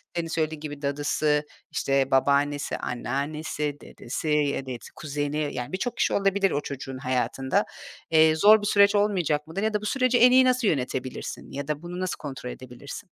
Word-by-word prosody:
senin 170 -1 -1
söylediğin 155 -1 -2
gibi 145 -1 -7
dadısı, 145 +1 0 0.3
işte, 135 0 0
babaannesi, 140 +2 +2
anneannesi, 145 +4 -3
dedesi, 125 +6 -6
ya 145 -2 +1
da, 130 - -6
evet, 120 - -7
kuzeni 145 0 -2
yani 125 +5 -5
birçok 235 +5 -3
kişi - - +1
olabilir 195 0 +2
o 145 - 0
çocuğun 135 -1 -6
hayatında. 130 0 0 0.5
Eee, 160 0 +5
zor 210 +6 +6
bir 205 - -2
süreç 200 0 +5
olmayacak 180 -8 +1
mıdır 190 +6 -4
ya 220 0 0
da 210 - 0
bu - - -6
süreci 255 +2 +2
en 250 +1 +7
iyi 260 0 +6
nasıl 255 -2 +2
yönetebilirsin 130 -4 -3
ya 140 0 -5
da 150 0 -2
bunu 175 +1 -7
nasıl 185 -1 -2
kontrol 135 -4 -6
edebilirsin? 130 - -9
150 Hz, 180 wpm, -26 LUFS, 140-195 Hz, 0.5 s, en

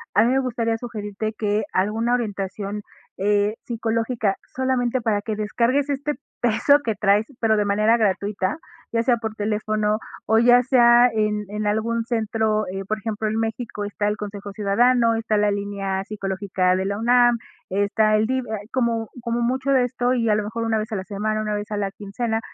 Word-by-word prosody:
a 210 - +6
mí 240 - +2
me 265 - +3
gustaría 230 -3 -1
sugerirte 215 -2 -5
que 210 0 0
alguna 220 +5 +1
orientación, 205 -3 -3 0.4
eh, 205 +2 +1
psicológica, 225 -2 -1 0.2
solamente 255 -1 0
para 215 -3 0
que 215 0 -3
descargues 235 +7 0
este 285 +1 -1 0.3
peso 245 +5 +4
que 225 -4 -1
traes, 205 +1 +2
pero 220 -1 +3
de 210 - +1
manera 215 +3 +3
gratuita, 200 0 0 0.3
ya 230 - +1
sea 245 -1 +3
por 220 -1 -4
teléfono 215 0 0 0.3
o 220 - +4
ya 245 +1 +6
sea 240 -1 +6
en 210 -1 0
en 210 0 -3
algún 225 +2 0
centro, 220 -2 0
eh, 195 +1 -4
por 215 - -1
ejemplo, 215 0 -3
en 220 +1 -1
México 225 -2 -3
está 205 0 -2
el 210 0 -1
Consejo 205 -1 -7
Ciudadano, 230 +3 +3
está 220 -1 0
la 205 0 +2
línea 200 -1 -2
psicológica 190 -2 -1
de 190 +1 -1
la 200 +1 -2
UNAM, 240 0 +4 0.3
está 205 +2 +2
el 215 +1 +3
DIF, 260 0 -1
hay 210 -2 -5
como 235 -3 0
como 235 0 -1
mucho 260 +3 0
de 260 -2 +4
esto 245 0 0
y 230 -3 +1
a 210 - +4
lo 210 - 0
mejor 225 +2 -4
una 225 -1 +1
vez 215 +1 -5
a - - -1
la 190 - -3
semana, 215 +1 -2
una 210 -1 -2
vez 205 +2 -4
a 210 - -1
la 200 -1 -1
quincena, 220 +3 -3
215 Hz, 190 wpm, -23 LUFS, 205-235 Hz, 0.4 s, a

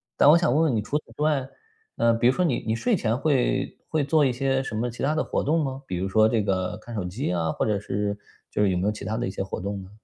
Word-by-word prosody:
但 145 - +6
我 165 - +8
想 150 -8 +2
问 160 +2 +3
问 145 -7 +2
你 105 - +1
除 140 +8 -1
此 - - -24
之 - - -6
外， 145 -4 +1 0.5
呃， 115 0 +4
比 120 +1 +2
如 130 - +5
说 180 +5 +1
你 135 - +1
你 110 - 0
睡 225 - +1
前 115 -6 0
会 140 -3 0
会 155 -2 +1
做 155 0 +3
一 130 - +2
些 135 +1 0
什 115 - -6
么 120 +3 -1
其 120 - -7
它 150 +3 +2
的 160 - +1
活 - - -1
动 160 +3 +2
吗？ 135 0 -5
比 90 - -4
如 95 +2 -1
说 110 +3 +4
这 110 -2 +1
个 95 -2 -1
看 120 -1 -9
手 100 - -2
机 90 +2 -2
啊， 80 -2 0
或 - - -1
者 105 -2 +1
是 100 0 -2 0.3
就 105 - +1
是 100 - +3
有 90 - 0
没 90 - -1
有 105 - +2
其 105 - -9
它 110 +1 -2
的 120 - -1
一 - - -3
些 95 - -3
活 95 - -5
动 100 +1 -4
呢？ 95 - -13
115 Hz, 335 characters per minute, -25 LUFS, 100-140 Hz, 0.5 s, 我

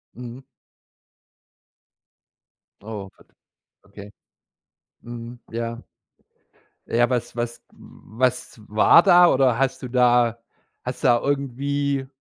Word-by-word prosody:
Mhm. 125 +2 -10 2.4
Oh, 105 -3 -7
Gott. - - -22 0.6
Okay. 100 0 -13 0.9
Mhm, 120 0 -9
ja. 115 +1 -4 1.0
Ja, 120 +2 +1
was 120 -2 -2
was 120 0 -4
was 125 0 -4
war 110 +10 +6
da, 180 -2 +7
oder 130 -3 +2
hast 135 -1 0
du 125 - -5
da 120 -2 +3 0.4
hast - - -6
du - - +4
da 120 -1 +4
irgendwie 140 0 -2
120 Hz, 100 wpm, -23 LUFS, 115-135 Hz, 2.4 s, da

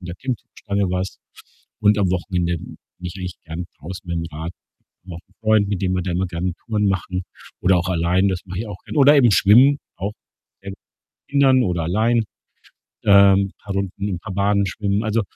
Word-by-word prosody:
an 90 - -11
der 85 - -6
Klimmzugstange 100 -5 -3
war's 90 +1 -3 0.6
und 105 0 +4
am 95 - +2
Wochenende 90 -1 -1
bin - - -11 0.2
ich 90 -1 -5
eigentlich 90 -1 -5
gern 80 +2 -5
draußen 90 +3 -9
mit'm 85 -1 -2
Rad 80 +3 -5 0.5
noch 90 -2 -9
'n 100 - -30
Freund, 110 -2 +3
mit 100 -2 -2
dem 95 -1 +1
wir 90 - 0
dann 90 -1 -2
immer 95 +1 0
gerne 90 0 -3
Touren 105 -2 0
machen 95 -1 -2 0.4
oder 90 0 +4
auch 90 +1 -1
allein, 90 +2 +2
das 95 -2 -1
mache 90 -1 -7
ich 115 - -3
auch 100 -3 -8
gern. - - -5
Oder 145 +1 +7
eben 130 -4 +6
schwimmen, 125 +9 +6 0.2
auch 100 +4 -3 0.5
gerne 100 0 -7 0.3
mit - - -70
Kindern 135 -3 +4
oder 85 -3 -1
allein, 110 +7 +2 0.8
ähm, 100 -1 +6
paar 100 -1 -7
Runden, 100 +1 -3
'n 95 -4 -3
paar 100 +1 -7
Bahnen 100 +1 +2
schwimmen. 100 +2 -1
Also, 110 +1 +1
95 Hz, 195 wpm, -21 LUFS, 90-105 Hz, 0.8 s, Oder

